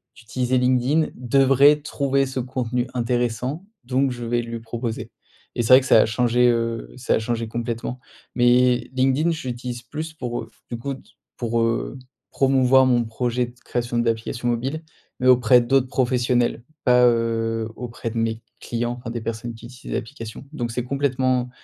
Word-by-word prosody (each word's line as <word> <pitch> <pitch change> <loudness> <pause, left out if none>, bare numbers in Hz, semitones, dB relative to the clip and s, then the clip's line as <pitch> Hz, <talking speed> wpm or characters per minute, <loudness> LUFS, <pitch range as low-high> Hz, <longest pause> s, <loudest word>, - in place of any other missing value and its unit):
d'utiliser 125 +2 -1
LinkedIn 130 +5 +2
devrait 135 +3 +4
trouver 140 -2 0
ce 130 0 -4
contenu 125 -1 -2
intéressant, 125 - -1 0.2
donc 130 +2 +1
je 120 -1 -6
vais 120 +1 0
lui 115 0 -6
proposer». 115 0 -5 0.4
Et - - 0
c'est 120 +3 +4
vrai 130 - +9
que - - -7
ça 115 - +6
a - - +4
changé, 120 +2 +2
heu, 115 - -1
ça - - 0
a - - +1
changé 115 0 -2
complètement. 120 +2 -4 0.3
Mais 125 0 +3
LinkedIn, 135 +5 +2
je 160 -5 -3
l'utilise 120 0 -5
plus 155 +6 -6
pour, 120 -4 -4
heu, - - -10 0.2
du 120 - -4
coup 135 +3 -4
d 135 - -14 0.3
pour, 115 -1 -1
heu, 115 +3 -1 0.3
promouvoir 130 -1 +4
mon 120 -2 +3
projet 120 +2 -1
de 120 - -14
création 120 0 -2
d'applications 115 +1 -1
mobiles, 130 +7 -2 0.4
mais 130 - +1
auprès 125 -1 +6
d'autres 130 +1 +2
professionnels, 120 -2 +1 0.2
pas, 125 -1 +5
heu, 115 -1 0
auprès 120 -1 -5
de 115 - -6
mes 115 0 -1 0.2
clients 120 +1 -3
enfin 115 - -7
des 120 - -4
personnes 115 +1 -4
qui 115 - -12
utilisent 125 +1 -9
l'application. 115 0 -6
Donc 120 -6 -3
c'est 125 +1 -2
complètement 130 -2 0
120 Hz, 170 wpm, -23 LUFS, 115-130 Hz, 0.4 s, vrai